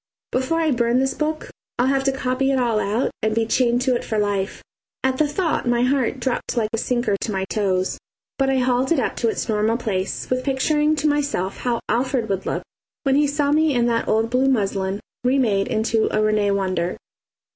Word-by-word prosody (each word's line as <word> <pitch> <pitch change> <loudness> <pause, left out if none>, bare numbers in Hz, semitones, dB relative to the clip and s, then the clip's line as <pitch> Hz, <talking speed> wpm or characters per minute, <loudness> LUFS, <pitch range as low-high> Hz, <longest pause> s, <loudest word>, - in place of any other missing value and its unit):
Before 260 +6 0
I 320 -2 +2
burn 240 -1 +2
this 265 0 +1
book 310 +1 -3 0.3
I'll 245 - +2
have 270 0 +2
to 270 - +3
copy 265 0 -1
it 270 - +2
all 235 -4 +1
out 215 +5 0
and 220 0 0
be 225 0 +2
chained 240 +1 +2
to 255 -2 +2
it - - -2
for 220 - -2
life. 205 -2 -1 0.4
At 260 0 +1
the 305 - +3
thought 305 -3 -1
my 240 0 +2
heart 260 0 +1
dropped 245 0 -2
like 220 -2 0
a - - +1
sinker 240 -4 0
to 220 - -2
my 190 -1 -1
toes; 190 -2 -1 0.4
but 270 0 +2
I 270 - +2
hauled 255 +1 +1
it 330 - +4
up - - -1
to 230 - +1
its - - -3
normal 220 +1 +1
place 200 -5 -3
with 255 0 -1
picturing 295 +3 +1
to 305 0 0
myself 285 -10 -1
how 240 -2 -1
Alfred 245 -2 0
would 195 -1 -2
look - - -2 0.4
when 270 - +2
he 295 +1 +4
saw 285 0 0
me 310 -1 +3
in 240 -1 +2
that 230 -1 0
old 225 +1 +1
blue 260 +2 +3
muslin 200 -4 0 0.2
remade 245 -6 +2
into 220 0 +1
a 215 - +1
Rene 215 -1 +2
wonder. 185 -3 -1
245 Hz, 210 wpm, -22 LUFS, 215-270 Hz, 0.4 s, it